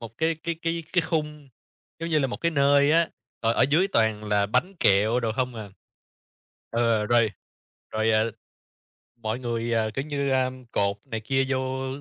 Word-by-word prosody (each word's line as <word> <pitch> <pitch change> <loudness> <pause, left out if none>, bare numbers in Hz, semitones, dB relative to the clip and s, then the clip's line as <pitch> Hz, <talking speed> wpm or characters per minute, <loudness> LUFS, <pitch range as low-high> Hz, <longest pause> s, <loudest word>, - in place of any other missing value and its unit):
một 115 -1 -10
cái 160 +1 +1
cái 170 - -1
cái 165 0 -1
cái 175 -2 +3
khung 150 -3 -3 0.5
giống 165 - -3
như 155 - +3
là 135 - +1
một 125 - -4
cái 170 - 0
nơi 140 -1 +4
á, 165 0 +4 0.3
rồi 115 0 +3
ở - - +4
dưới 175 +7 +3
toàn 110 - +1
là 105 -1 +2
bánh 125 - 0
kẹo 105 +5 +4
đồ 115 -2 -1
không 125 +1 -2
à. 110 -3 -8 1.0
Ờ, 115 -2 +1
rồi 115 -2 +3 0.6
rồi, 110 +1 +1
à, 110 0 +3 1.0
mọi 110 +2 -2
người, 120 -1 -2
ờ, 110 -1 +1
kiểu 135 +5 -3
như, 140 -2 -2
a, 130 -1 +2 0.2
cột 100 0 0
này 115 -5 -4
kia 135 +5 0
vô 130 0 -2
125 Hz, 185 wpm, -25 LUFS, 110-145 Hz, 1.0 s, nơi